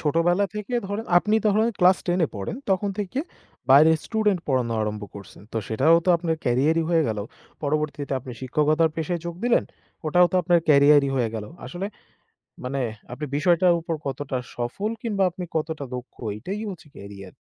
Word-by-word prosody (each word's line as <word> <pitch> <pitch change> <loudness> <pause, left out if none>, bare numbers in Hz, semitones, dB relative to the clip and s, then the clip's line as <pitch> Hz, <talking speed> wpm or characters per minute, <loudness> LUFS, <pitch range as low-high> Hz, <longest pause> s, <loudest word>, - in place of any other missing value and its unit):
ছোটবেলা 170 +5 +2
থেকে 210 +4 -4
ধরেন, 205 +3 -4
আপনি 210 +4 +1
ধরেন 215 +3 +3
ক্লাস 185 0 +6
১০ 175 0 +1
এ - - 0
পড়েন, 100 - -4
তখন 190 +2 +1
থেকে 205 +5 -3 0.5
বাইরে 150 +4 +8
স্টুডেন্ট 210 -5 +1
পড়ানো 125 -4 +1
আরম্ভ 105 0 -3
করছেন। 100 -1 -12
তো - - -4
সেটাও 140 +9 +4
তো - - -2
আপনার 165 -1 -1
ক্যারিয়ারই 145 +7 +2
হয়ে 165 -2 +4
গেল। 110 -2 -2 0.4
পরবর্তীতে, 145 -1 -2
আপনি 125 0 -9
শিক্ষকতার 150 +5 +2
পেশায় 165 +1 -2
যোগ 170 - -4
দিলেন। 245 - +3 0.4
ওটাও 175 +3 +5
তো, - - -3
আপনার 175 0 +4
ক্যারিয়ারই 145 -1 +6
হয়ে 120 -3 +1
গেল। 110 -2 -4 0.2
আসলে, 180 +2 -4 0.8
মানে 135 +2 -2 0.3
আপনি 140 +5 -5
বিষয়টার 175 +3 +4
উপর 165 0 -3
কতটা 135 0 -3 0.2
সফল 120 - -3
কিংবা 205 -4 0
আপনি 180 +1 -7
কতটা 155 -2 -2
দক্ষ, 125 +1 -9 0.2
এটাই 195 - -5
হচ্ছে 180 -4 -9
কেরিয়ার। 100 -2 -10
160 Hz, 170 wpm, -24 LUFS, 135-180 Hz, 0.8 s, বাইরে